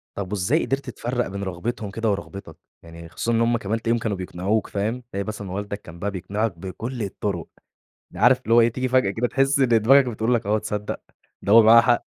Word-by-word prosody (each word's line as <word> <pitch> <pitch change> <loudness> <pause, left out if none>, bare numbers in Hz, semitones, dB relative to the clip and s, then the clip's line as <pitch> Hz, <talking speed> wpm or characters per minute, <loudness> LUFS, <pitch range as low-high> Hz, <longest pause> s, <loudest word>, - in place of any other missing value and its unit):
طَب 100 -1 -5
وإزاي 105 - +1
قِدرت 135 -1 -2
تفرّق 120 0 -2
بين 100 +1 -5
رغبتهم 100 +3 -4
كده 115 +1 -1
ورغبتك؟ 100 -4 -6 0.3
يعني 85 0 -11
خصوصًا 115 - -2
إن 115 0 +2
هم 115 0 +2
كمان 110 +2 -3
تلاقيهم 115 0 +1
كانوا 105 -4 -2
بيقنعوك، 95 +4 -2
فاهم؟ 110 +5 -3
تلاقي 100 +1 -2
مثلًا 105 -3 -6
والدك 100 +1 -4
كان 85 0 -12
بقى 100 +2 -2
بيقنِعك 100 +1 -3
بكُلّ 110 +6 -5
الطُرق. 100 -2 -4 0.6
ده - - -9
عارف - - +5
اللي 115 +2 +1
هو 120 - +7
إيه، 115 - +5
تيجي 130 +1 -2
فجأة 125 -6 +3
كده 115 +4 -1
تحِس 135 +1 +2
إن 130 -3 +3
دماغك 120 +4 +5
بتقول 115 +1 0
لك، 115 -3 -1
آه 105 +1 +2
تصدّق، 105 0 -4 0.4
ده 100 - +1
هو 115 0 +9
معاه 115 +2 +8
حق. 120 0 +2
110 Hz, 220 wpm, -23 LUFS, 100-120 Hz, 0.6 s, هو